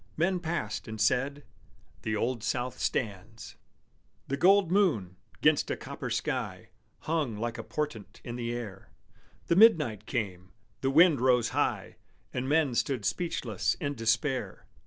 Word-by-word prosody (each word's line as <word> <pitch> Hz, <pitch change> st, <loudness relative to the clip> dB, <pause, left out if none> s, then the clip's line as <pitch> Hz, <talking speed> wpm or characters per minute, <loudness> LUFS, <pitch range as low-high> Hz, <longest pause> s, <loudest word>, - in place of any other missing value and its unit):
Men 180 Hz, +3 st, +1 dB
passed, 160 Hz, -, -3 dB
and 110 Hz, -1 st, -6 dB
said, 135 Hz, +6 st, +1 dB, 0.6 s
"The 110 Hz, -1 st, -2 dB
Old 115 Hz, +1 st, -1 dB
South 120 Hz, +2 st, -2 dB
stands!" 105 Hz, 0 st, -3 dB, 0.7 s
The 140 Hz, -, 0 dB
gold 190 Hz, +3 st, +4 dB
moon, 125 Hz, -, +2 dB, 0.3 s
'gainst 150 Hz, -1 st, +3 dB
a -, -, -1 dB
copper -, -, -6 dB
sky, -, -, -3 dB, 0.3 s
Hung 150 Hz, -9 st, -1 dB
like 115 Hz, +1 st, -3 dB
a -, -, -4 dB
portent 145 Hz, -9 st, -5 dB
in 120 Hz, -, -6 dB
the 120 Hz, -1 st, -3 dB
air, 110 Hz, -5 st, -6 dB, 0.6 s
The 170 Hz, -, +2 dB
midnight 150 Hz, -, +5 dB
came, 95 Hz, -7 st, -4 dB, 0.3 s
the 135 Hz, -, 0 dB
wind 155 Hz, -1 st, +5 dB
rose 125 Hz, -2 st, +3 dB
high, -, -, -1 dB, 0.4 s
And 130 Hz, +1 st, -2 dB
men 150 Hz, -3 st, +3 dB
stood 115 Hz, -1 st, -1 dB
speechless 125 Hz, -, -1 dB
in 145 Hz, 0 st, -3 dB
despair. 115 Hz, +3 st, -1 dB
125 Hz, 140 wpm, -29 LUFS, 110-150 Hz, 0.7 s, midnight